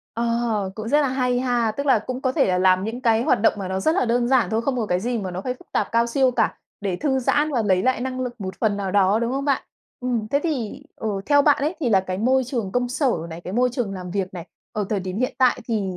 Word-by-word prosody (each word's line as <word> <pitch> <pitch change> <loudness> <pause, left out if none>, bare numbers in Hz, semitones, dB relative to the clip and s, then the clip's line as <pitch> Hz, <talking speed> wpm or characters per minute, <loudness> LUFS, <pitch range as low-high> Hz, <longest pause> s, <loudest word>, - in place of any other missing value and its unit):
Ờ, 230 -4 0
cũng 220 0 -5
rất 295 +4 +4
là 285 - +2
hay 250 -1 0
ha. 245 -3 +1
Tức 280 +6 -4
là 265 - +5
cũng 255 +4 -5
có 260 -1 0
thể - - +2
là 180 -1 +1
làm 185 0 +3
những 225 +3 -4
cái 230 -3 +3
hoạt 220 - +2
động 225 - +4
mà 195 -2 -4
nó 190 0 -2
rất 315 +11 +2
là 360 - +2
đơn 240 0 +1
giản 245 -8 +3
thôi, 225 +1 0
không 270 0 -1
có 225 -3 -1
cái 180 -1 0
gì 240 +3 -1
mà 190 -3 -4
nó 180 +1 -4
phải 250 +5 -3
phức - - -21
tạp - - 0
cao 230 0 +3
siêu 260 +2 +2
cả, 245 - +1 0.3
để 195 -3 -2
thư 265 +4 0
giãn 290 +4 +1
và 240 -4 +1
lấy 185 -3 +2
lại 255 +1 +1
năng 255 0 -3
lực 245 -2 -5
một 190 -1 -4
phần 210 -3 +1
nào 195 -2 -3
đó, 200 +1 +3
đúng 235 +1 -1
không 275 +1 -2
bạn? 280 -2 +1 0.4
Ừm, 240 -4 -2
thế 280 +5 +1
thì, 265 -11 -3
ừ, 220 - -3 0.2
theo 285 0 +5
bạn 290 0 +5
ấy, 310 +5 0
thì 265 - +1
là 195 -4 +4
cái 185 0 -4
môi 260 +4 +2
trường 235 -6 -3
công 245 +1 0
sở 260 +2 +1 0.2
này, 165 +1 -7
cái 180 - -7
môi 250 +4 +3
trường 235 -6 -2
làm 180 -1 -7
việc 190 0 -3
này, 175 -1 -7 0.3
ở 210 - -1
thời 205 -3 0
điểm 185 +1 -4
hiện 255 +1 -1
tại 255 -1 +3
thì 220 -3 0
235 Hz, 295 wpm, -23 LUFS, 200-255 Hz, 0.4 s, là